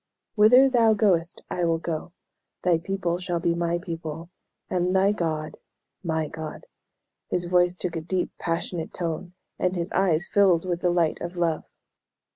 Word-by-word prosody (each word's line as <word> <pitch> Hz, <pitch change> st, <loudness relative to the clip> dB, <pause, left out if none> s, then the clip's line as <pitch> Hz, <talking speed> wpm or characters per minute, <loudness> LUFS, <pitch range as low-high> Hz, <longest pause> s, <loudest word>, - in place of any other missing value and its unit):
"'Whither 245 Hz, +5 st, +7 dB
thou 230 Hz, -4 st, +4 dB
goest 180 Hz, -5 st, +1 dB
I 180 Hz, -, -1 dB
will 165 Hz, -1 st, +2 dB
go; 165 Hz, 0 st, -4 dB, 0.5 s
thy 175 Hz, -3 st, +3 dB
people 175 Hz, -1 st, -2 dB
shall 175 Hz, -1 st, -2 dB
be 170 Hz, 0 st, +1 dB
my 170 Hz, 0 st, 0 dB
people, 165 Hz, -1 st, -6 dB, 0.4 s
and 180 Hz, 0 st, 0 dB
thy 195 Hz, +1 st, +4 dB
God 160 Hz, -6 st, -2 dB, 0.5 s
my 160 Hz, -2 st, -1 dB
God.'" 155 Hz, -1 st, -7 dB, 0.6 s
His 175 Hz, -, 0 dB
voice 180 Hz, 0 st, +2 dB
took 175 Hz, -1 st, -3 dB
a 165 Hz, -, -2 dB
deep, 180 Hz, +3 st, -1 dB
passionate 165 Hz, 0 st, -3 dB
tone, 175 Hz, +1 st, -4 dB, 0.3 s
and 180 Hz, 0 st, +1 dB
his 175 Hz, +1 st, -3 dB
eyes 180 Hz, -3 st, +2 dB
filled 185 Hz, -4 st, +3 dB
with 175 Hz, -1 st, -1 dB
the 180 Hz, -, +2 dB
light 170 Hz, -2 st, +1 dB
of 175 Hz, +1 st, -5 dB
love. 165 Hz, -2 st, 0 dB
175 Hz, 160 wpm, -25 LUFS, 165-185 Hz, 0.6 s, Whither